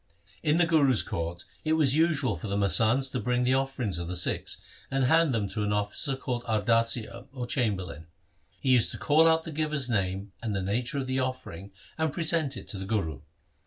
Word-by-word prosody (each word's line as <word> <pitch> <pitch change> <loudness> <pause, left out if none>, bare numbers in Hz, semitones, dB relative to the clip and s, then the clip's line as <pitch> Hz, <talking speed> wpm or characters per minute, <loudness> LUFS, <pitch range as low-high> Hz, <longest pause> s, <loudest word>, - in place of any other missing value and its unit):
1 150 -2 +2
In - - +2
the 175 - +4
Guru's 145 -7 +3
court 85 +1 -5 0.2
it 155 - +1
was 145 -4 +4
usual 155 -8 +2
for 110 - -7
the 100 0 -1
masands 115 +6 +3
to 125 - -2
bring 125 0 0
the 125 +1 +2
offerings 130 -8 -1
of 85 - -5
the 90 - -4
Sikhs 90 - 0 0.3
and 135 0 0
hand 160 +3 +4
them 110 -5 0
to 105 - -3
an 105 0 0
officer 105 +7 0
called 125 -2 -4
Ardasia 115 +2 +1
or 125 -2 -5
chamberlain. 95 - -2 0.5
He 135 - -2
used 125 -3 +4
to - - -6
call 160 +2 +4
out 160 0 +3
the 160 - -7
giver's 150 -4 0
name 95 -1 -1
and 110 -4 -2
the 95 - -1
nature 120 +8 -1
of 135 - -2
the 130 0 -1
offering 130 -8 -5 0.3
and 160 -1 +1
present 160 -3 0
it - - -9
to 100 - -4
the 95 - -5
Guru. 95 - -2
125 Hz, 210 wpm, -28 LUFS, 100-140 Hz, 0.5 s, the